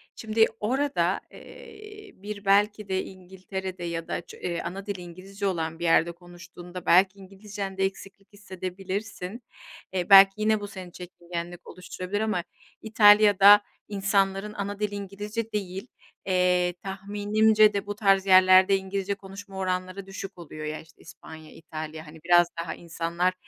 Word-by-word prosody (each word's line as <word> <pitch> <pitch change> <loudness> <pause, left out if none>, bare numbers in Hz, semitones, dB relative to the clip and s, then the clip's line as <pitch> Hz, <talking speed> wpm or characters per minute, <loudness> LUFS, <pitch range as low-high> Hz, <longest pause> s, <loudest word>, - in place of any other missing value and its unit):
şimdi 220 0 +2
orada, 270 +6 0
eee, 420 -4 -13
bir 205 +1 -8
belki 205 +1 +2
de 190 0 0
İngiltere'de, 190 0 -8
ya 165 -1 -4
da - - -3
ç - - -14 0.3
ana 195 +2 -6
dili 200 -3 -5
İngilizce 190 +3 -6
olan 165 -3 -3
bir - - -6
yerde 165 0 +3
konuştuğunda, 175 +1 -12
belki 190 +3 +4
İngilizcende 195 0 -5
eksiklik 195 +1 -8
hissedebilirsin. 190 +2 -6 0.5
E, 180 0 -2
belki 195 0 +9
yine 215 0 +1
bu 205 - -5
seni 190 -3 -10
çekingenlik 175 -1 -8
oluşturabilir, 185 +2 -5
ama 215 -5 -1 0.4
İtalya'da, 205 -2 +7 0.3
insanların 195 0 0
ana 200 0 -5
dili 210 -1 -2
İngilizce 205 +3 -5
değil. 195 +1 -4 0.4
Eee, 180 -1 +2
tahminimce 210 +2 +2
de 200 -1 -2
bu 205 0 -5
tarz 195 -2 +3
yerlerde, 185 +1 +6
İngilizce 195 +1 -3
konuşma 195 0 -11
oranları 185 +1 -3
düşük 195 0 -8
oluyor 155 -2 -9
ya, 155 +1 -4
işte, 160 -1 -21
İspanya, 160 -1 -13
İtalya, 155 0 -8
hani 160 +1 -13
biraz 175 0 +5
daha 165 - -5
insanlar 170 +2 -2
195 Hz, 140 wpm, -26 LUFS, 180-205 Hz, 0.5 s, belki